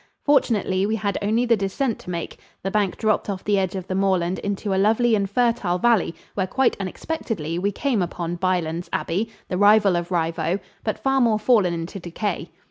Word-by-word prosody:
Fortunately, 205 -9 +2
we 220 - 0
had 205 -2 -1
only 220 +4 +1
the 235 -1 +4
descent 215 +5 -1
to - - -11
make. 170 -2 -5 0.2
The 195 - -2
bank 205 -3 0
dropped 215 -1 0
off 190 -2 -4
the 205 -1 +2
edge 190 -1 -1
of 185 -2 -4
the 185 - -4
moorland 185 -2 +1
into 200 0 -2
a 190 - +2
lovely 225 +3 +3
and 200 -2 +1
fertile 230 -5 +1
valley, 215 -4 +2 0.2
where, 190 -2 -1
quite 265 +6 +2
unexpectedly, 185 - -3
we 200 +3 0
came 245 -1 0
upon 175 0 -3
Bylands 175 -2 -1
Abbey, 200 +7 -1 0.2
the 180 - -2
rival 205 -2 +5
of 175 0 -2
Rievaulx, 165 +1 0 0.2
but 215 - -1
far 270 0 +1
more 230 -3 +3
fallen 210 -6 +3
into 165 +4 -5
decay. 175 +1 -4
195 Hz, 195 wpm, -23 LUFS, 180-220 Hz, 0.2 s, rival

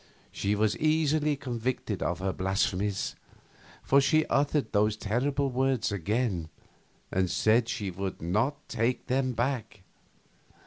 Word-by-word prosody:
She 100 +1 0
was 105 0 +2
easily 155 -1 +2
convicted 120 -5 -3
of 85 - 0
her 95 +1 -2
blasphemies, 95 +1 -1 0.7
for 140 +1 +5
she 155 +3 +3
uttered 145 +1 +1
those 105 +1 +2
terrible 135 +6 0
words 130 -3 +1
again 100 -3 -1 0.6
and 95 -1 +1
said 110 +5 +3
she 105 -7 -3
would 95 +1 -4
not 110 - -1
take 120 +2 -1
them 130 0 0
back. 120 -5 -2
115 Hz, 125 wpm, -29 LUFS, 100-135 Hz, 0.7 s, for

